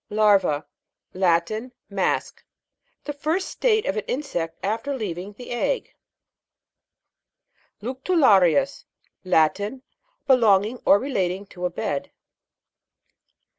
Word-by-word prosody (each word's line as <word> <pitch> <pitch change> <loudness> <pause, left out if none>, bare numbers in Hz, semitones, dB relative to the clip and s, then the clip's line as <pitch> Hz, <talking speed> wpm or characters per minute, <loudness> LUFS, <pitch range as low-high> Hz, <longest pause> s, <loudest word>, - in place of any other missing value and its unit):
LAR'VA. 200 -8 +3 0.5
Latin. 185 +7 0 0.2
A - - -14
mask. 195 -2 -1 0.6
The 290 - -4
first 315 +6 -1
state 435 -3 +1
of 190 - -1
an 215 - -1
insect 210 - -3
after 230 +7 -2
leaving 195 -2 -5
the 225 - -11
G - - -9
SS 245 - -1 2.0
LECTULA'RIUS. 260 - +3 0.4
Latin. 200 +8 +1 0.4
Belonging 225 -3 +4
or 200 - +7
relating 200 -6 -2
to 180 -2 -4
a - - -5
bed. 145 -4 -3
210 Hz, 100 wpm, -24 LUFS, 185-265 Hz, 2.0 s, or